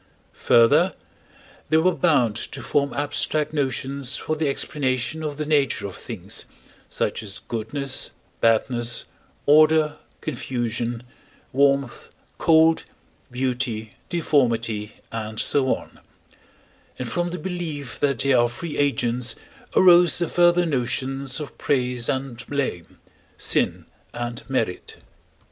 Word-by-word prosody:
Further, 115 -1 +5 0.7
they 155 - +4
were 175 +3 +4
bound 135 -13 +2
to - - -5
form 140 -1 +1
abstract 145 +1 -1
notions 135 -1 -1
for 155 - -2
the 155 -1 0
explanation 140 +1 -1
of 150 -2 -4
the 155 - -2
nature 145 -7 +1
of 100 - -6
things, - - -5 0.4
such - - -1
as 100 -2 -5
goodness, 135 +4 -2 0.3
badness, 120 +1 +1 0.4
order, 155 +1 +5 0.2
confusion, 120 -3 -3 0.5
warmth, 140 -1 +1 0.3
cold, 160 0 +5 0.5
beauty, 125 -3 -2 0.2
deformity, 115 -10 0 0.2
and 110 -1 -5
so 135 -2 +2
on; - - -13 1.0
and 125 - -4
from 175 +8 -1
the 180 - -4
belief 160 -7 -5
that 140 -3 +1
they 140 +4 +2
are 120 -1 +4
free 150 +6 -6
agents 125 -4 +1 0.4
arose 175 -3 +6
the 170 - 0
further 175 +1 +4
notions 135 -1 -2
of 145 -4 -8
praise 125 -3 0
and 130 -3 -3
blame, 135 -12 -3 0.4
sin - - +1 0.3
and 120 0 -4
merit. 115 -9 -2
135 Hz, 115 wpm, -23 LUFS, 120-150 Hz, 1.0 s, arose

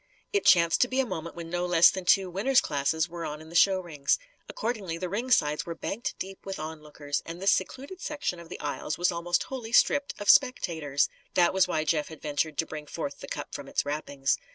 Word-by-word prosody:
It 405 - +1
chanced 170 -2 +5
to 250 - +5
be 260 +1 -1
a 265 - +3
moment 170 -7 -5
when 165 -1 -7
no 175 0 -1
less 170 -1 +7
than 190 -1 -5
two 190 +1 +4
"Winners' 245 +9 +3
Classes" 155 +3 0
were 170 0 -7
on 150 -1 -5
in 160 0 -12
the 170 - -11
showrings. 175 -6 +3 0.3
Accordingly 210 - -3
the 180 +1 -4
ring 230 +7 -3
sides 150 -10 +3
were 170 - -6
banked 210 +7 -4
deep 190 0 -7
with 195 -1 -5
onlookers, 150 -2 -5
and 165 +1 -8
this 195 +1 +3
secluded 275 - -2
section 290 - -3
of 170 -1 -12
the - - -7
aisles 150 +1 -3
was 175 +1 +2
almost 175 0 0
wholly 245 -4 -7
stripped 285 +3 +3
of 205 - -6
spectators. 160 - +3 0.3
That 175 0 +4
was 190 -1 +4
why 155 -3 0
Jeff 155 -1 0
had 160 - -10
ventured 150 0 -2
to 160 - +1
bring 150 -1 -8
forth - - -5
the - - -8
cup - - -6
from - - -6
its - - -1
wrappings. 145 -2 -1
170 Hz, 225 wpm, -28 LUFS, 155-195 Hz, 0.3 s, less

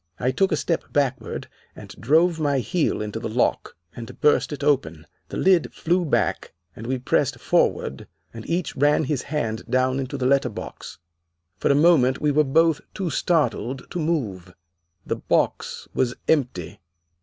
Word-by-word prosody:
I 125 - +1
took 190 +9 +1
a - - +2
step 165 - -2
backward 135 -2 -1 0.3
and - - -11
drove 160 +6 +2
my 145 -3 +1
heel 155 - 0
into 105 +1 -5
the 115 - -4
lock, 120 +3 0 0.2
and 115 -2 -9
burst 150 - +3
it 145 -1 -5
open. 85 - 0 0.2
The - - -5
lid 185 -3 +3
flew 175 +2 0
back, 105 -9 -1 0.2
and 115 - -8
we 130 +1 0
pressed 130 0 0
forward, 65 - 0 0.3
and 115 -1 -8
each 170 0 -1
ran 145 +3 +3
his 145 -2 -1
hand 115 -7 -3
down 130 +1 +1
into 135 +1 -4
the 130 - -2
letterbox. 130 -4 -1 0.6
For - - 0
a 140 - +4
moment 145 -4 +4
we 150 - +1
were 150 +2 +4
both 160 +2 +2
too 185 -4 -2
startled 135 -7 0
to 180 - -3
move. 110 - -2 0.5
The - - -2
box - - -1
was 125 -1 0
empty. 125 - 0
135 Hz, 165 wpm, -23 LUFS, 120-155 Hz, 0.6 s, a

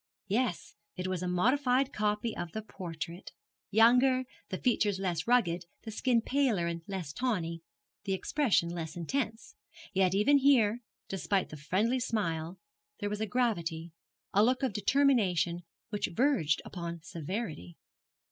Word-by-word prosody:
Yes, 220 -2 -1 0.2
it 180 - -4
was 185 -2 -2
a 180 - -2
modified 255 +8 +2
copy 210 +2 0
of 170 -2 -5
the 220 - -4
portrait 170 -3 -7 0.4
younger, 250 +4 +5 0.2
the 185 - -3
features 210 -4 +1
less 180 -3 -2
rugged, 180 -8 +2 0.2
the 220 - -6
skin 230 +1 +1
paler 255 -11 +1
and 170 0 -3
less 185 -7 -4
tawny, 175 -9 -1 0.4
the 195 - 0
expression 200 - +1
less 165 -2 -5
intense. 225 - -3 0.4
Yet 190 -1 +3
even 280 +8 +5
here, 245 -5 +4 0.3
despite 195 0 -1
the - - -8
friendly 200 - 0
smile, 175 -8 -2 0.4
there 205 -1 -2
was 210 0 -3
a 220 - 0
gravity, 170 -9 -1 0.4
a 205 - +5
look 255 +4 +2
of 255 -6 +1
determination 200 - +2 0.3
which 210 - -1
verged 170 - +2
upon 170 -2 -6
severity. 165 - -5
205 Hz, 140 wpm, -31 LUFS, 170-245 Hz, 0.4 s, younger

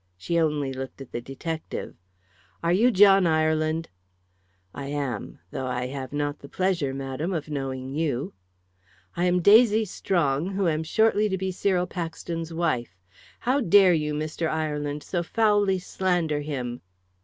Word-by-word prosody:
She 170 - -1
only 150 -4 0
looked 130 +1 -7
at 135 - -10
the 120 - -4
detective. 155 +6 -5 0.7
"Are 170 +1 +2
you 225 +7 +5
John 195 -4 +6
Ireland?" 155 0 +1 0.9
"I 140 - -6
am. 140 -6 -4
Though 130 - -3
I 125 0 -2
have 130 0 -5
not 145 0 -2
the 140 - -12
pleasure, 185 -7 0
madam, 135 +5 -4
of 155 -3 -3
knowing 135 -2 -4
you." 145 -4 -1 0.8
"I 175 +1 +1
am 180 -1 +2
Daisy 220 +1 +6
Strong, 175 -2 0
who 195 -2 +1
am 155 -1 +1
shortly 215 +5 +2
to 190 - -1
be 190 0 -2
Cyril 180 -1 +1
Paxton's 165 -1 -5
wife. 140 - -1 0.4
How 260 +4 +1
dare 195 -3 +6
you, 150 -2 0
Mr. 155 +2 -2
Ireland, 150 -2 -2
so 175 - -2
foully 205 0 +2
slander 175 -4 -1
him!" 125 -5 -4
160 Hz, 150 wpm, -26 LUFS, 140-185 Hz, 0.9 s, John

